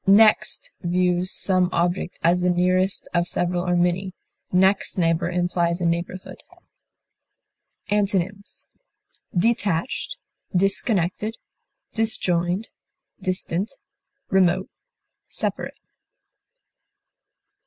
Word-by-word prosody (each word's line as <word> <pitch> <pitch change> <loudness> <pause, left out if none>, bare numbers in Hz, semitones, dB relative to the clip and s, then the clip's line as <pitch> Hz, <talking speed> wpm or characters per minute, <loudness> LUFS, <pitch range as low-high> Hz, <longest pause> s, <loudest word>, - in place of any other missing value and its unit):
Next 215 +1 +4
views 180 0 +1
some 185 -2 +3
object 175 +2 -1
as 175 +2 +3
the 180 - +2
nearest 185 +2 +1
of 175 0 +1
several 175 0 -1
or 180 -1 +1
many; 180 +2 0 0.4
next 190 +2 +2
neighbor 170 0 +1
implies 175 -1 0
a 175 - -1
neighborhood. 170 +2 -3 1.5
Antonyms: 200 -1 -1 0.7
detached, 220 - 0 0.4
disconnected, 195 +2 +1 0.6
disjoined, 185 -3 0 0.5
distant, 185 +1 -2 0.6
remote, 190 -1 +2 0.6
separate. - - -3
180 Hz, 80 wpm, -23 LUFS, 175-195 Hz, 1.5 s, Next